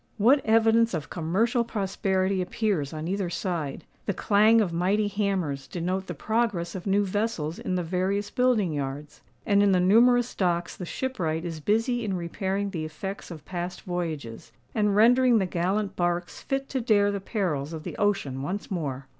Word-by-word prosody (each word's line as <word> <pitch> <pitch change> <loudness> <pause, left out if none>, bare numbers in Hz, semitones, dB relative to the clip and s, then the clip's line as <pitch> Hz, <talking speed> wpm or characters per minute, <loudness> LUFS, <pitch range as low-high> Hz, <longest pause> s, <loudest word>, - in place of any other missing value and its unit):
What 255 +6 +4
evidence 225 -1 +4
of 150 -2 -5
commercial 205 +9 +1
prosperity 195 -3 0
appears 180 -6 -1
on 155 +1 -5
either 190 -1 -1
side! 170 -6 -3 0.2
The 200 - 0
clang 215 +2 +4
of 190 -6 0
mighty 195 +5 +1
hammers 190 -9 -1
denote 185 +2 -3
the 175 - -5
progress 210 -1 -1
of 190 0 -6
new 200 +1 +3
vessels 190 -6 -2
in 185 - -2
the 180 - 0
various 190 +4 -1
building 235 -9 +2
yards; 145 +1 -5 0.2
and 200 -1 +4
in 200 -1 +4
the 180 - +4
numerous 240 +6 +4
docks 175 -2 0
the 180 - -7
shipwright 170 -12 -2
is 165 -2 -4
busy 225 - +1
in 200 -3 -1
repairing 195 +3 -2
the 165 -4 -3
effects 175 +6 -6
of 155 -4 -9
past 180 0 -5
voyages, 160 -10 -5 0.2
and 210 -2 +2
rendering 245 +3 +5
the 195 - +2
gallant 190 +4 -1
barks 175 0 -1
fit 270 0 -2
to 265 - -1
dare 205 -3 +3
the 200 -1 -3
perils 170 - -2
of 160 -2 -6
the - - -6
ocean 195 -11 0
once 190 +10 -4
more! 140 -7 -3
190 Hz, 175 wpm, -26 LUFS, 170-215 Hz, 0.2 s, rendering